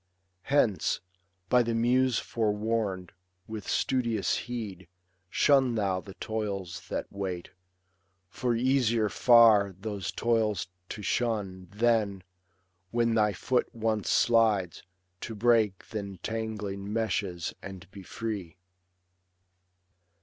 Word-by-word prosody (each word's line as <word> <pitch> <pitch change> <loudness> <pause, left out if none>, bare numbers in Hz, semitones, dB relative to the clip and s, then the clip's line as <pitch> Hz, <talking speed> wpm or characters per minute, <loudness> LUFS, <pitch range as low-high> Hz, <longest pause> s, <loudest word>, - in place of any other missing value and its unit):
Hence, 125 -8 +2 0.5
by 125 +5 +5
the 115 -1 -1
muse 125 +1 +3
forewam'd, 105 -4 -1 0.4
with 110 -3 -7
studious' 120 -6 +1
heed 100 -7 -5 0.4
Shun 135 -1 +3
thou 95 -4 0
the 95 +1 -12
toils 100 -5 -4
that - - -2
wait; 95 -3 -5 0.8
for 120 +6 -1
easier 120 -3 +2
far 110 -5 +6
Those 100 -2 -4
toils 110 -7 0 0.2
to 105 - -6
shun, 100 -5 -1
than, 105 -3 +1 0.7
when 115 +1 +1
thy 105 -2 +3
foot 125 +6 0
once 110 -2 -1
slides, 110 -7 +3 0.4
To 115 - -6
break 110 -3 +2
th' - - -18
entangling 100 0 -4
meshes 100 -6 -1
and 95 -1 -9
be 100 - -10
free. 95 -4 -5
110 Hz, 105 wpm, -29 LUFS, 100-115 Hz, 0.8 s, far